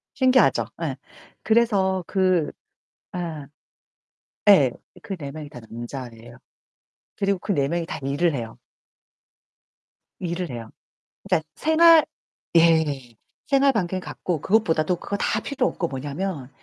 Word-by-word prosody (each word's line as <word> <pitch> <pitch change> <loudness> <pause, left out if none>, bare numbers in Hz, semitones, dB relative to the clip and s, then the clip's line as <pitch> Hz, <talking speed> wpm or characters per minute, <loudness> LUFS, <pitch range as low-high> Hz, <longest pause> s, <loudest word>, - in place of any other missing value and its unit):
신기하죠. 255 - +4 0.2
예. 140 -5 -2 0.5
그래서 200 -5 +2
그 185 -5 +1 0.6
예. 160 -5 -5 1.0
예, 145 -11 +7 0.3
그 195 - -5
4 140 -4 -6
명이 150 -2 -8
다 125 - -10
남자아이에요. 120 0 -9 0.8
그리고 200 -2 0
그 200 - -2
4 140 -4 +1
명이 170 +2 -1
다 - - -6
일을 145 +5 +1
해요. 115 -4 -5 1.6
일을 175 -1 -3
해요. 115 -2 -7 0.6
네. 185 -4 +3
생활 320 0 +6 0.5
예. 155 -7 +3 0.3
생활반경이 230 -10 +2
같고 175 -3 -4
그것보다도 180 -5 +2
그거 200 - -4
다 210 - 0
필요 265 0 0
없고 170 - -2
뭐냐하면 145 +1 -4
170 Hz, 225 characters per minute, -24 LUFS, 140-195 Hz, 1.6 s, 예